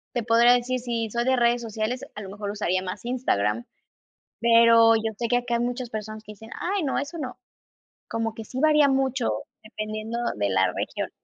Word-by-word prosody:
Te 240 - 0
podría 235 +2 +5
decir, 250 +1 0
si 235 -2 -2
soy 235 +2 -1
de 260 0 +3
redes 240 0 +2
sociales, 225 +2 -3
a 210 - -6
lo 195 - -8
mejor 205 +1 -5
usaría 185 -3 -1
más 185 +5 -6
Instagram. 115 - 0 0.8
Pero 230 -1 +6
yo 220 0 -2
sé 235 - -1
que 245 - +3
acá 245 -1 -1
hay 235 - +1
muchas 245 0 -3
personas 215 0 -6
que 210 - -9
dicen: 220 +2 -13
"Ay 385 +1 -1
no, 275 -3 -1
eso 285 +4 -4
no". 260 -5 -6 0.7
Como 225 -1 -2
que 225 - -8
sí 255 +4 -6
varía 300 -1 +5
mucho 265 -2 +1 0.3
dependiendo 215 +1 -5 0.2
de 100 -1 0
la 95 0 +3
región. - - -4
230 Hz, 200 wpm, -25 LUFS, 215-245 Hz, 0.8 s, Pero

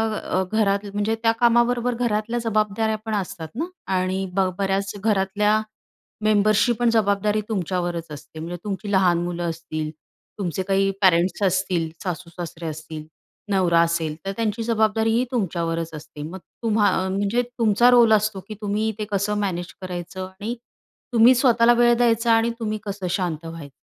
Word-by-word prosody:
अ, 190 -2 -1
घरात 205 -2 +1
म्हणजे 205 +2 0
त्या 225 - +5
कामाबरोबर 240 +1 +3
घरातल्या 230 0 -1
जबाबदाऱ्या 220 0 0
पण 220 - -3
असतात 190 -4 -4
ना 315 - -1 0.3
आणि 185 +1 -1
ब 190 0 +2
बऱ्याच 195 0 0
घरातल्या 210 +1 +2 0.6
मेंबर्सची 215 +2 +4
पण 240 -1 +3
जबाबदारी 210 -1 +2
तुमच्यावरच 175 -4 -2
असते. 150 +2 -10
म्हणजे 170 +2 -5
तुमची 205 0 -4
लहान 185 -3 +4
मुलं 175 -1 -2
असतील, 155 -1 -4 0.5
तुमचे 185 -1 -2
काही 195 0 +2
पॅरेंट्स 180 +1 +3
असतील, 180 -3 +1
सासू-सासरे 170 -2 -6
असतील, 155 0 -7 0.5
नवरा 180 -4 +3
असेल 165 -2 0
तर 195 - -1
त्यांची 225 0 -1
जबाबदारीही 225 +1 +2
तुमच्यावरच 170 -7 -1
असते. 150 -1 -9
मग 170 +5 -7 0.2
तुम्हा 215 -2 +3 0.2
अ, - - -2
म्हणजे 200 +5 +1 0.2
तुमचा 230 +2 +4
रोल 235 -2 +6
असतो, 215 -1 +1
की 215 - -6
तुम्ही 210 +1 0
ते 215 - -2
कसं 205 +1 0
मॅनेज 175 -4 -3
करायचं 185 0 -5
आणि 195 +5 -6 0.6
तुम्ही 235 +2 +7
स्वतःला 240 -2 +5
वेळ 240 0 +5
द्यायचा 230 -1 +3
आणि 225 +1 +3
तुम्ही 215 -1 -2
कसं 195 -2 -4
शांत 170 -4 -2
व्हायचं. 165 -5 -9
200 Hz, 150 wpm, -23 LUFS, 175-220 Hz, 0.6 s, तुम्ही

